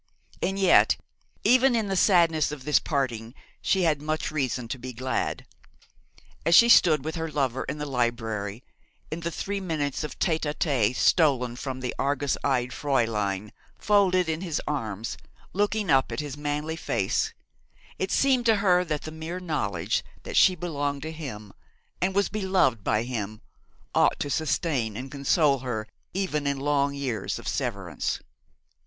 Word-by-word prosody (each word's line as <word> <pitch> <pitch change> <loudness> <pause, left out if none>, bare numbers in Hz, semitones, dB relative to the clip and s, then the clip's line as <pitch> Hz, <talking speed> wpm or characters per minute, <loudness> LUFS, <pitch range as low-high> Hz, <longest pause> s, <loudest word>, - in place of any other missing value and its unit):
And 195 +1 -1
yet, 195 -2 +5 0.5
even 255 0 +5
in 220 -3 0
the 195 - -1
sadness 170 -6 +4
of 145 -3 -7
this 150 +2 +3
parting, 120 -5 -2 0.3
she 190 -2 +2
had 155 -4 +2
much 155 +1 -2
reason 130 -5 -2
to 130 - -4
be 125 +1 -7
glad. 130 +2 -2 1.0
As 165 +2 +4
she 235 +5 +8
stood 155 - +6
with 160 - -2
her 165 0 -3
lover 135 -4 -1
in 140 - -4
the 150 - -4
library, 115 -5 -2 0.5
in 160 - -3
the 170 0 -3
three 200 +4 -3
minutes 155 -7 -2
of 150 -3 -6
tête 160 -3 +1
à 150 -1 -2
tête 130 -7 +1
stolen 130 -9 +3
from 130 0 -5
the 125 - -2
argus 140 0 0
eyed 125 -3 +1
Fräulein, 105 -8 -1 0.3
folded 190 -4 +3
in 160 +1 -2
his 170 -5 -2
arms, 115 -7 -3 0.4
looking 205 -1 0
up 135 -1 +3
at - - -3
his 145 -2 -4
manly 150 +2 -3
face, 165 - -1 0.7
it - - -1
seemed 260 -3 +3
to 225 - +6
her 185 -3 +3
that 155 -4 -3
the 155 - -6
mere 160 +3 -5
knowledge 100 - -1 0.2
that - - -6
she 185 - +6
belonged 145 -5 -3
to 160 - -4
him 110 -11 -8 0.5
and 190 +1 0
was 200 0 +3
beloved 190 - +1
by 105 +2 +1
him 110 -4 -4 0.5
ought - - +3
to 145 - -2
sustain 135 - 0
and 130 +2 -7
console 140 0 +2
her 115 -4 -4 0.3
even 155 -7 -1
in 140 -1 0
long 140 0 +1
years 125 -8 -2
of - - -9
severance. - - -2
145 Hz, 165 wpm, -26 LUFS, 125-170 Hz, 1.0 s, she